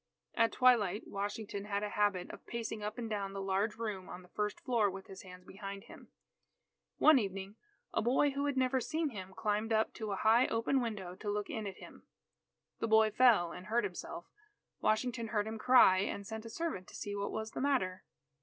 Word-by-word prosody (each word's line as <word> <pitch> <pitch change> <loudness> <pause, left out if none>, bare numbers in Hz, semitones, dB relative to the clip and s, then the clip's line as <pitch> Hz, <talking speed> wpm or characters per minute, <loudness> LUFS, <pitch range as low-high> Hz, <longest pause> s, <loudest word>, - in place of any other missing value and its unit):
At 230 0 +3
twilight, 225 -6 +4
Washington 200 0 -4
had 205 0 -2
a 210 - -2
habit 205 -4 0
of - - -12
pacing 230 -2 -4
up 210 +1 -4
and 235 -2 -3
down 200 -3 -3
the 195 - -4
large 195 +2 0
room 210 -5 -4
on 180 - -8
the 180 - -18
first 210 +1 -2
floor 230 -5 +2
with 195 0 -8
his 190 - -10
hands 180 -1 -12
behind 195 +1 -7
him. - - -14 0.9
One 310 -3 +7
evening, 195 -1 -4 0.4
a - - +1
boy 260 +5 +3
who 280 +1 -1
had 285 -2 -1
never 260 0 +2
seen 315 +4 -1
him, 190 -6 -8
climbed 215 +1 -1
up 220 0 +2
to 220 -2 -5
a - - 0
high 225 +5 +4
open 230 +4 +1
window 205 -7 -4
to 210 - -5
look 205 0 -2
in 220 -2 -3
at 195 - -7
him. - - -13 0.7
The - - -1
boy 220 0 +5
fell 215 -7 +5
and 180 +3 -9
hurt 235 +2 +2
himself. 180 -2 -5 0.5
Washington 230 +1 0
heard 210 -2 0
him 220 0 -5
cry, 215 -6 +6
and 200 +1 -2
sent 220 +2 -6
a - - -7
servant 235 - -4
to - - -12
see 205 -1 -4
what 200 0 -2
was 220 0 -4
the - - -4
matter. 250 -10 0
210 Hz, 210 wpm, -33 LUFS, 195-230 Hz, 0.9 s, One